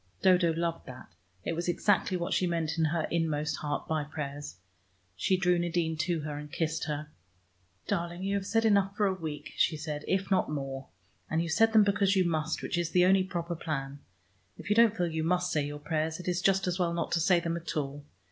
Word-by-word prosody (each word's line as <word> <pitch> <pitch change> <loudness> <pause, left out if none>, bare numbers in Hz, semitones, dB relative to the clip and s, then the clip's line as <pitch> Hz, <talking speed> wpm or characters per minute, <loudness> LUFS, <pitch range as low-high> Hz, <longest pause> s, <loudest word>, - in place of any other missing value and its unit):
Dodo 180 -3 +5
loved 165 0 -2
that: 130 -1 -10 0.3
it - - -2
was 170 +2 -3
exactly 185 +1 +2
what 170 -1 -2
she 180 - +2
meant 165 -1 -1
in 160 - +4
her 160 +1 0
inmost 155 -3 0
heart 145 -1 -3
by 155 -1 0
prayers. 145 -1 -6 0.6
She 185 - +1
drew 180 -1 +2
Nadine 170 -1 0
to 165 0 0
her 150 -1 -5
and 150 0 -9
kissed 160 0 -1
her. 150 0 -4 0.7
"Darling, 170 +1 -2
you 195 +1 -1
have 200 -1 -1
said 225 0 +2
enough 200 -1 +3
for 210 - +3
a 195 - +2
week," 150 -4 -6
she 160 - +2
said, 150 -1 -5
"if 190 +1 0
not 190 - +2
more. 135 -2 -4 0.4
And 160 - +1
you 170 0 -1
said 225 +8 +4
them 220 -1 +7
because 200 -1 +2
you 190 - +4
must, 160 -1 -1
which 175 - -1
is 170 -1 -1
the 180 +1 +4
only 190 0 +5
proper 175 -2 -3
plan. 140 -4 -4 0.6
If - - -6
you - - +4
don't 225 -1 +5
feel 180 - +1
you 160 -1 -2
must 180 +2 +1
say 150 - +1
your 145 0 -6
prayers, 155 +2 -2
it 180 - -8
is 180 0 0
just 195 0 +3
as 180 0 -1
well 170 -1 +1
not 170 -2 -2
to 170 - +2
say 175 +2 +4
them 170 0 -2
at 170 -1 -4
all. 145 0 -3
170 Hz, 225 wpm, -30 LUFS, 155-185 Hz, 0.7 s, them